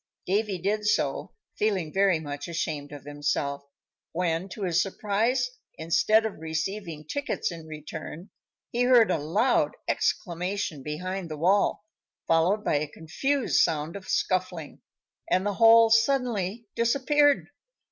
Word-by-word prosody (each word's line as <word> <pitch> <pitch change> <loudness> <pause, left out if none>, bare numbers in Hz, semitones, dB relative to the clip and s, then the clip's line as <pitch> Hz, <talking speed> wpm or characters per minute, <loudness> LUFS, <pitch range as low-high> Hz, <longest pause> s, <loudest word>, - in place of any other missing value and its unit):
Davy 200 +1 0
did 210 +4 -1
so, - - 0 0.2
feeling 190 -7 0
very 195 -3 +3
much 145 -2 -6
ashamed 155 -4 -3
of 145 -2 -9
himself, 145 -1 -2 0.5
when, 170 +1 -1
to 200 +3 -7
his 175 -1 +2
surprise, 220 +6 0 0.3
instead 215 +7 +3
of 220 - -4
receiving 160 0 -4
tickets 285 - -2
in 165 -2 -9
return, 155 +4 -8 0.4
he 240 - -1
heard 245 -5 +5
a 165 - +1
loud 200 - +1
exclamation 180 -3 -1
behind 180 +5 -4
the 155 - -5
wall, 195 +5 +2 0.4
followed 175 +6 +2
by - - +2
a 150 +1 -2
confused 255 - -1
sound 155 +1 +1
of 195 -2 -9
scuffling, 180 -4 -1 0.5
and 185 +2 +2
the 205 - 0
hole 225 +1 +6
suddenly 225 -3 +1
disappeared. 280 +5 +2
185 Hz, 130 wpm, -27 LUFS, 160-220 Hz, 0.5 s, hole